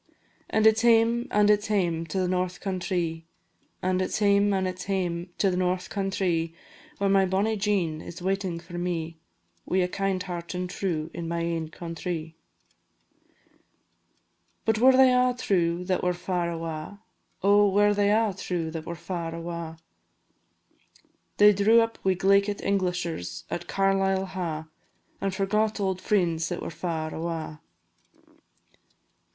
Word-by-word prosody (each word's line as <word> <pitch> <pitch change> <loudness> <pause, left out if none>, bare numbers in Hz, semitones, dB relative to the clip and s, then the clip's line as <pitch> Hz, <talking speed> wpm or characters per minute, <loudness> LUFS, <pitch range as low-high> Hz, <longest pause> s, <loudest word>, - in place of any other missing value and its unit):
An' 220 0 +2
it 220 0 +6
's - - -1
hame, 235 +1 +4
an' 210 0 +3
it 210 0 +5
's 210 - -6
hame 170 -6 0
to 160 - -4
the 185 - +1
north 180 0 -1
countrie, 175 -4 -2 0.6
An' 185 0 +1
it 185 - -1
's - - -2
hame, 200 -1 +3
an' 190 -1 +1
it 185 0 -4
's - - -6
hame 180 -3 -2
to 195 - +2
the - - -1
north 180 0 -1
countrie, 180 -4 -1 0.4
Where 200 - 0
my 195 -1 +4
bonnie 200 +4 +1
Jean 195 -7 0
is 170 - -9
waiting 190 -2 -2
for 175 +1 -8
me, 165 -2 -3 0.5
Wi' 185 - 0
a - - +4
heart 180 0 -1
kind 185 -3 -3
and 180 0 -2
true, 170 -4 -3
in 170 -1 -5
my 170 0 -2
ain 165 -1 -2
countrie. 165 -1 -5 2.3
"But 220 -1 +2
were 260 +3 +7
they 260 -1 +7
a' 250 0 +3
true 175 -6 +1
that 185 0 0
were 180 0 0
far 180 -1 -2
awa? 165 +4 -6 0.4
Oh! 205 +1 +5
were 205 +1 +4
they 205 0 +2
a' 215 -1 +2
true 170 -4 -3
that 160 0 -6
were 170 - -4
far 170 -1 -5
awa'? 170 -1 -6 1.6
They 210 0 +7
drew 210 +4 +5
up 225 0 0
wi' 190 -1 +2
glaikit 200 +2 +3
Englishers 175 - -2
at 175 - -4
Carlisle 195 0 +1
Ha', 160 -4 -3 0.5
And 195 - 0
forgot 210 +3 0
auld 190 -2 -1
frien's 170 -5 +1
that 175 - -4
were - - -5
far 160 -3 -3
awa. 160 -2 -4
185 Hz, 155 wpm, -26 LUFS, 170-200 Hz, 2.3 s, were